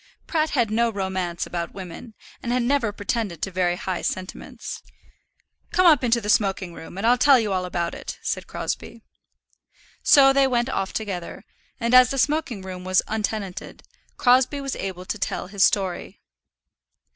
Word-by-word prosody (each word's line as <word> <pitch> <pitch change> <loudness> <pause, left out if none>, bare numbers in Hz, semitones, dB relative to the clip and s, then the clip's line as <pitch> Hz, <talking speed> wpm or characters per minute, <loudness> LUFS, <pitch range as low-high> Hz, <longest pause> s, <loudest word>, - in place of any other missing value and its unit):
Pratt 315 -2 0
had 235 -6 +1
no 235 +2 +2
romance 190 -3 -3
about 170 -1 -5
women, 195 +5 -9 0.3
and 240 - -3
had 250 0 +1
never 245 -3 +1
pretended 205 -4 -3
to 195 - -2
very 180 -1 +1
high 185 0 -3
sentiments. 185 0 -5 0.9
"Come 370 - +3
up 305 -6 +6
into 235 -1 +3
the 210 - -7
smoking 195 -4 +1
room 170 +2 -10
and 200 - -2
I'll 245 +1 +4
tell 270 0 +6
you 210 -4 -1
all 185 -1 -1
about 175 -1 -2
it," - - -7
said - - -3
Crosbie. 230 - -5 1.0
So 270 -1 +6
they 275 0 +4
went 240 -1 0
off 195 -6 -2
together, 190 -6 -5 0.3
and, 235 0 -1
as 255 0 +8
the 275 - -3
smoking 275 -7 0
room 185 -1 -7
was 185 0 +2
untenanted, 210 -3 -4 0.3
Crosbie 260 +1 +3
was 275 -1 -4
able 185 -2 -5
to 215 - -4
tell - - -2
his 195 +1 0
story. 190 -4 0
215 Hz, 170 wpm, -24 LUFS, 185-250 Hz, 1.0 s, as